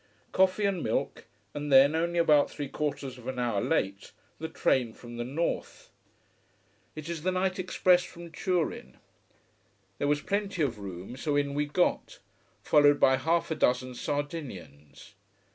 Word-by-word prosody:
Coffee 190 +2 +3
and 195 -4 0
milk - - -2 0.3
and 145 0 -4
then, 135 +2 +7
only 170 +2 0
about 150 -4 +4
three 145 -2 -5
quarters 135 -3 -4
of 125 - -12
an 130 -1 -4
hour 120 -5 0
late, 100 +1 -1 0.3
the 160 - -4
train 125 -7 +1
from 120 0 -11
the 120 - -2
north. 145 +8 -3 1.0
It 155 0 -7
is 170 -2 -4
the 185 +3 0
night 185 +1 -1
express 180 -1 +3
from 170 -1 -11
Turin. 180 -3 -2 1.0
There 145 - 0
was 145 0 +1
plenty 200 -4 -1
of 120 -6 -2
room 95 +3 -7
so 145 +2 -1
in 140 -1 0
we 145 +1 0
got, 175 +5 0 0.5
followed 145 -1 +5
by 130 0 +5
half 165 +5 0
a - - +1
dozen 125 -1 +1
Sardinians. 120 - -6
145 Hz, 155 wpm, -29 LUFS, 125-170 Hz, 1.0 s, then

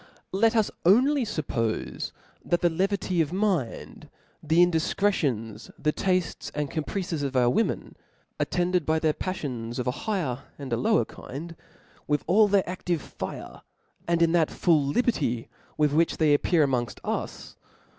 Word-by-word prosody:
Let 225 +4 +3
us 220 -2 +2
only 255 - +4
fuppofe 120 - -2 0.3
that 175 - 0
the 175 - +4
kvky 190 0 0
of 155 -1 -1
mind, 185 - -2 0.3
the 160 +1 0
indifcretions, 160 - 0
die 150 - +1
taftcs 185 0 -1
and 150 -2 -2
caprices 165 0 -3
of 140 -1 -3
our 120 -1 +4
• - - -1
women, 225 - -1 0.4
attended 180 -1 +1
by 160 +2 +1
their 155 -1 +2
pafllops 125 -12 -4
of 125 - -2
a 125 - +1
higher, 155 - -2 0.2
and 135 -4 -5
a - - +1
lower 120 -1 +2
kif)d> 165 +10 -8 0.5
with 145 -1 +1
all 210 +4 +5
their 200 -1 +3
a£):ive 175 -3 -4
(ire^ - - -6 0.5
and 170 0 +3
in 165 - +3
that 165 -2 +3
full 160 -4 +2
liberty 140 - 0 0.3
with 150 -2 +2
which 165 +2 +2
they 155 -2 +4
appear 155 +2 +3
amongft 125 -4 -1
us - - -4
160 Hz, 155 wpm, -26 LUFS, 140-185 Hz, 0.5 s, all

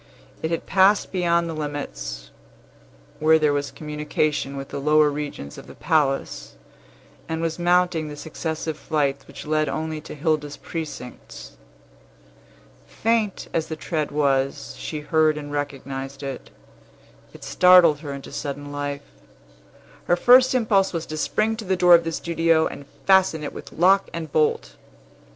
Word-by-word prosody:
It 160 - -2
had 165 - -2
passed 195 +2 +3
beyond 170 -2 +1
the 165 - -4
limits 100 - -6 0.9
where 160 +1 +5
there 150 -2 +2
was 145 -1 -1
communication 150 -1 -2
with 135 0 -7
the - - -5
lower 150 +1 +4
regions 145 - -6
of - - -13
the - - -12
palace, 135 - -1 0.7
and 160 0 -2
was 165 0 -2
mounting 175 -2 +2
the 150 - -7
successive 160 +1 -5
flights 140 -3 -1
which - - -10
led 155 0 +1
only 155 -1 -3
to - - -9
Hilda's 150 -1 -1
precincts. 155 -6 -8 1.4
Faint 225 -3 -1
as 160 - -1
the 160 - -4
tread 155 -2 -3
was, 140 -1 0
she 155 -2 -5
heard 155 0 +2
and 145 -1 -7
recognized 140 -1 -5
it. 135 -2 -6 0.8
It - - -14
startled 180 -5 +6
her 145 -2 -7
into 140 -1 -8
sudden 145 -1 -5
life. 145 0 -4 1.0
Her 175 - +3
first 255 +6 +6
impulse 205 -6 +2
was 165 -1 -3
to 155 - -6
spring 215 +7 0
to 220 - -7
the 190 0 0
door 180 -1 +6
of 170 -1 +6
the 165 - -2
studio, 165 -1 +1
and 140 - -6 0.2
fasten 190 -5 +4
it 145 - -5
with - - -10
lock 195 +4 +3
and 160 -3 -5
bolt. 155 0 0
155 Hz, 150 wpm, -23 LUFS, 145-170 Hz, 1.4 s, startled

